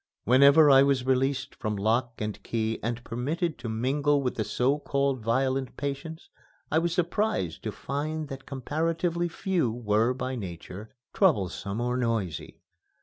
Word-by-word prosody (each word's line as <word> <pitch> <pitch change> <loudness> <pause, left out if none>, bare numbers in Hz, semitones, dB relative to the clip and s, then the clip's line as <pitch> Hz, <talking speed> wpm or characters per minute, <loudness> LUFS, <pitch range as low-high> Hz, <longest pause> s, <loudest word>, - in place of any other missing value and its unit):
Whenever 140 +5 +7
I 135 0 +8
was 135 -2 +2
released 135 +1 0
from 110 -2 -3
lock 115 +4 +1
and 105 -1 -4
key 110 -1 -2
and 120 +1 -3
permitted 155 +9 -2
to 115 - -5
mingle 140 +5 +1
with 125 - 0
the 110 - -2
so 135 +6 +1
called 140 -2 0
violent 130 +3 0
patients, 145 +3 -5 0.4
I 160 - +4
was 170 +1 0
surprised 175 - -1
to - - -1
find 150 +3 -4
that 135 -1 -8
comparatively 165 +5 -1
few 170 -6 0
were 115 +1 +1
by 130 0 -3
nature 95 0 -7 0.2
troublesome 100 - +1
or 125 +1 0
noisy. 115 - -2
130 Hz, 145 wpm, -27 LUFS, 115-150 Hz, 0.4 s, I